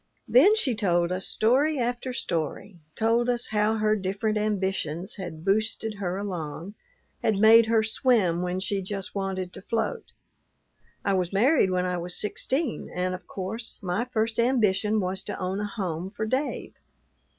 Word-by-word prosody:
Then 430 -3 +6
she 290 - +1
told 175 -5 +1
us 185 +1 -1
story 275 +7 +2
after 245 +1 -2
story 175 - -3 0.2
told 230 +2 +2
us 240 -1 0
how 215 +1 +2
her 215 0 +2
different 205 +2 -1
ambitions 195 -4 -1
had 175 -4 -7
"boosted" 215 +1 0
her 185 -1 -2
along, 180 -2 -5 0.5
had 215 -3 +1
made 220 +2 +7
her 225 -1 +3
swim 215 -6 +2
when 180 +1 -2
she 195 +1 -1
just 195 0 -5
wanted 190 -2 -3
to - - -8
float. 220 +1 -3 0.9
"I 200 - +2
was 180 -2 0
married 230 +2 +4
when 180 0 0
I 180 -1 -1
was 175 +1 -5
sixteen, 260 +6 -2
and 180 +1 -1
of 185 - -8
course, 220 +5 -5
my 185 +6 -1
first 225 -2 -1
ambition 215 -4 +2
was 190 +1 -2
to - - -4
own 185 +1 -2
a 210 - -2
home 185 -4 -4
for 220 +2 -4
Dave. 260 +6 -2
205 Hz, 160 wpm, -26 LUFS, 185-225 Hz, 0.9 s, made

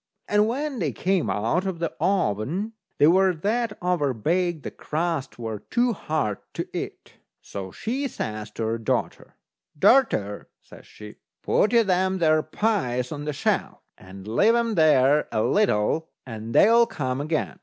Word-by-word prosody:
And 210 +1 +3
when 275 +2 -3
they 150 -7 -1
came 185 - 0
out 115 - 0
of 190 -3 -3
the 165 -1 -3
oven, 180 - 0 0.2
they - - +5
were 185 +3 +4
that 215 +6 -1
over 155 -8 +1
baked 170 - 0
the - - -5
crusts 160 -3 -3
were 110 -3 -5
too 240 0 +2
hard 150 - -2 0.2
to - - -3
eat. - - -7 0.2
So 95 -2 -7
she 265 - -3
says 110 - -5
to 115 - -4
her 110 +1 -1
daughter: 110 - -3 0.4
"Darter," 165 - +2
says - - -16
she, 105 0 -12 0.3
"put 215 - +2
you 235 -1 +5
them 190 -1 +1
there 155 -3 +3
pies 125 - -1
on 145 -1 -5
the 150 - -1
shelf, 140 - -1 0.2
and 95 +1 -12
leave 205 - +3
'em 235 -1 +1
there 150 -4 +4
a 110 -1 0
little, 160 - +1 0.2
and 115 -2 -7
they'll 230 +2 +6
come 130 -1 -3
again." 155 +1 -2
160 Hz, 160 wpm, -24 LUFS, -, 0.4 s, they'll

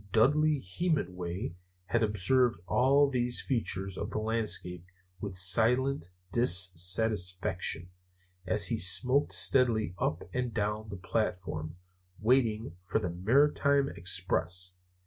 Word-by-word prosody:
Dudley 150 +7 +3
Hemenway 90 - -3 0.3
had 115 +5 -1
observed 110 +2 +1
all 135 +7 +3
these 125 -2 0
features 95 -7 -3
of - - -4
the - - -4
landscape 110 -6 -2 0.4
with 100 -2 -6
silent 115 +5 +2 0.2
dissatisfaction, 90 -3 +1 0.6
as 100 +1 +2
he 115 - -1
smoked 110 +11 +3
steadily 115 -8 +3
up 80 - -2
and 125 -2 -3
down 105 0 -3
the 100 - -7
platform, 90 -5 -3 0.4
waiting 110 -5 0
for - - 0
the 100 -6 -2
Maritime 140 +8 +2
Express. 90 0 -2
105 Hz, 110 wpm, -29 LUFS, 90-125 Hz, 0.6 s, Dudley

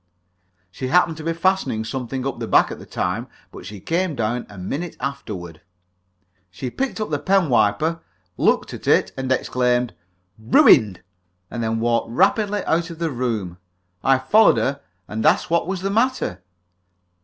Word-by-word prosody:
She 130 +6 -5
happened 165 +3 +3
to 160 - -8
be 165 - -1
fastening 170 - 0
something 130 +2 -4
up 135 -3 -3
the 115 - -4
back - - +4
at - - -7
the - - -12
time, - - -2 0.2
but - - -10
she 105 -1 -8
came 170 - -1
down 115 +1 -2
a 105 - -12
minute 145 - -5
afterward. 105 - -6 0.9
She 125 +7 -6
picked 270 -3 -3
up 215 -6 -3
the 145 - 0
pen 190 -1 +2
wiper, 120 +9 +2 0.4
looked - - +1
at - - -9
it, - - +3
exclaimed 125 -2 0 0.5
"Ruined!" 110 -3 +5 0.5
and 120 - -4
then 115 0 -1
walked 115 0 0
rapidly 205 - +1
out 170 +1 0
of 165 - -8
the 165 -1 -2
room. 110 -9 -3 0.4
I 135 0 +4
followed 215 +11 +4
her, 140 +1 -1 0.3
and 110 +1 -4
asked 180 - +3
what 170 0 +2
was 190 -1 -3
the 195 +1 -1
matter. 225 - 0
130 Hz, 165 wpm, -22 LUFS, 115-170 Hz, 0.9 s, Ruined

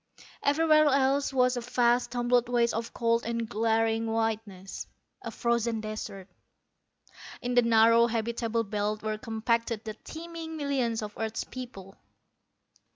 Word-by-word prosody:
Everywhere 305 +1 +4
else 275 0 +2
was 250 -1 +3
a - - -2
vast 240 0 +2
tumbled 245 0 +2
waste 240 -1 +2
of 230 +1 -3
cold 230 0 +1
and 230 0 -2
glaring 225 +1 +1
whiteness, 220 -4 -3 0.3
a - - -5
frozen 235 -1 0
desert. 215 -3 -6 1.1
In 245 0 -3
the 245 - +6
narrow 230 0 +5
habitable 230 0 -1
belt 210 0 -2
were 215 0 -2
compacted 230 0 -1
the 220 -2 -5
teeming 325 +5 -8
millions 260 -6 -1
of 210 0 -6
earth's 220 0 -2
peoples. 215 -7 -9
230 Hz, 130 wpm, -28 LUFS, 220-245 Hz, 1.1 s, the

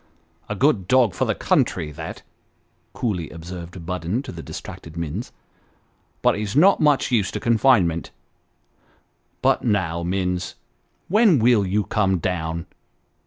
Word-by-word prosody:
" 80 0 -38
A 105 - -2
good 105 -6 +2
dog 125 -4 +4
for - - 0
the - - 0
country 75 -2 0
that! 80 +2 -8 0.4
" - - -43
coolly 95 -9 -2
observed 85 +1 -9
Budden 90 +7 -2
to - - -7
the 85 - -8
distracted 80 +1 -9
Minns, 85 +8 -4 0.5
" - - -41
but - - +5
he's 105 +1 -4
not 185 +7 +6
much 150 -5 +2
used 105 -6 +1
to - - -1
confinement. 110 -8 +2 1.3
But - - +3
now, 95 -7 0
Minns, 90 0 -2 0.5
when 210 -3 +5
will 115 -4 +3
you 105 +3 +1
come 95 -3 +1
down 85 -1 -3
95 Hz, 145 wpm, -22 LUFS, 85-115 Hz, 1.3 s, not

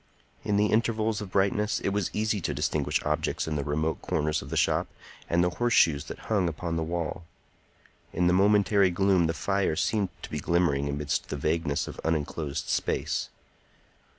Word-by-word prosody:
In 100 - +1
the 105 - +4
intervals 110 -1 +1
of 105 - -6
brightness 100 +3 +1
it - - -1
was 100 -2 -1
easy 105 -1 -1
to 75 -3 -2
distinguish 75 0 0
objects 75 +1 -1
in 80 - -2
remote 75 +3 -1
corners 75 0 -1
of 65 - -10
the 80 - -2
shop 75 - +2 0.4
and 85 +1 +3
the 90 - +1
horseshoes 85 -11 +3
that - - -8
hung 100 -6 +1
upon 85 +1 -4
the 80 - -1
wall; 85 +1 -3 0.9
in 90 - 0
the 90 - +4
momentary 100 0 +4
gloom 90 -1 +3
the 80 - 0
fire 100 0 0
seemed 100 +2 0
to - - -8
be 75 - -2
glimmering 75 -4 +1
amidst 70 0 -2
the - - -3
vagueness 75 0 -1
of - - -8
unenclosed 75 -2 -2
space. - - -1
85 Hz, 175 wpm, -27 LUFS, 75-100 Hz, 0.9 s, the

